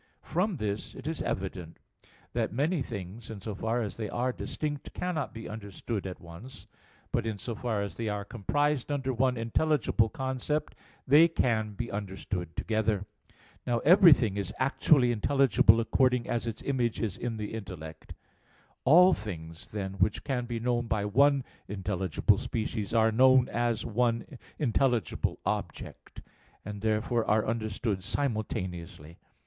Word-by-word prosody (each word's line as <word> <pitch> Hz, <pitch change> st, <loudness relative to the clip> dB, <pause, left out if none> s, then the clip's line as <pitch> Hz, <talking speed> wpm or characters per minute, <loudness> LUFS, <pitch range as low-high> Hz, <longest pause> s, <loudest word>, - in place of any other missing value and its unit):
From 180 Hz, +2 st, 0 dB
this 105 Hz, -3 st, -3 dB
it -, -, -10 dB
is 160 Hz, 0 st, -3 dB
evident 90 Hz, -3 st, -4 dB, 0.6 s
that -, -, 0 dB
many 150 Hz, -, 0 dB
things, 105 Hz, -2 st, -6 dB
in 110 Hz, -3 st, -6 dB
so 105 Hz, +2 st, -5 dB
far 115 Hz, +4 st, -1 dB
as 105 Hz, -, -5 dB
they 110 Hz, -3 st, -3 dB
are 125 Hz, +3 st, -1 dB
distinct, 145 Hz, +1 st, -5 dB
cannot 170 Hz, -6 st, -2 dB
be 115 Hz, 0 st, -8 dB
understood 105 Hz, 0 st, -5 dB
at 90 Hz, -, -7 dB
once; 95 Hz, +10 st, -11 dB, 0.5 s
but -, -, 0 dB
in 110 Hz, -2 st, -2 dB
so 115 Hz, +4 st, -5 dB
far 110 Hz, -2 st, -2 dB
as 100 Hz, -, -6 dB
they 115 Hz, -2 st, -2 dB
are 105 Hz, -1 st, -3 dB
comprised 145 Hz, +6 st, 0 dB
under 135 Hz, -2 st, -1 dB
one 125 Hz, +1 st, +1 dB
intelligible 115 Hz, 0 st, +1 dB
concept, 130 Hz, +5 st, -2 dB, 0.3 s
they 150 Hz, +5 st, +7 dB
can 110 Hz, -9 st, 0 dB
be 120 Hz, +3 st, -5 dB
understood 95 Hz, -4 st, -4 dB
together. 110 Hz, -2 st, 0 dB, 0.6 s
Now 120 Hz, -, +2 dB
everything 150 Hz, -, +6 dB
is 100 Hz, -2 st, -2 dB
actually 130 Hz, -1 st, +3 dB
intelligible 120 Hz, -1 st, +4 dB
according 125 Hz, +1 st, +2 dB
as 120 Hz, 0 st, -1 dB
its 115 Hz, -, -5 dB
image 125 Hz, -5 st, 0 dB
is 110 Hz, -6 st, -2 dB
in 115 Hz, -2 st, -4 dB
the 105 Hz, 0 st, -5 dB
intellect. 80 Hz, -8 st, -8 dB, 0.7 s
All 180 Hz, +7 st, +7 dB
things, 85 Hz, -6 st, -7 dB
then, 95 Hz, -2 st, -4 dB
which 95 Hz, +3 st, +1 dB
can 125 Hz, -4 st, -2 dB
be 120 Hz, -1 st, -3 dB
known 120 Hz, 0 st, 0 dB
by 105 Hz, -3 st, 0 dB
one 140 Hz, +6 st, +4 dB, 0.2 s
intelligible 95 Hz, -3 st, 0 dB
species, 110 Hz, -2 st, -3 dB
are 110 Hz, 0 st, +4 dB
known 130 Hz, +2 st, +5 dB
as 120 Hz, -1 st, 0 dB
one 115 Hz, 0 st, +1 dB, 0.3 s
intelligible 125 Hz, -3 st, +1 dB
object, -, -, -5 dB, 0.4 s
and 105 Hz, 0 st, -6 dB
therefore 110 Hz, +2 st, +1 dB
are 105 Hz, +1 st, +3 dB
understood 110 Hz, -3 st, -2 dB
simultaneously. 90 Hz, -, -3 dB
115 Hz, 145 wpm, -29 LUFS, 105-130 Hz, 0.7 s, they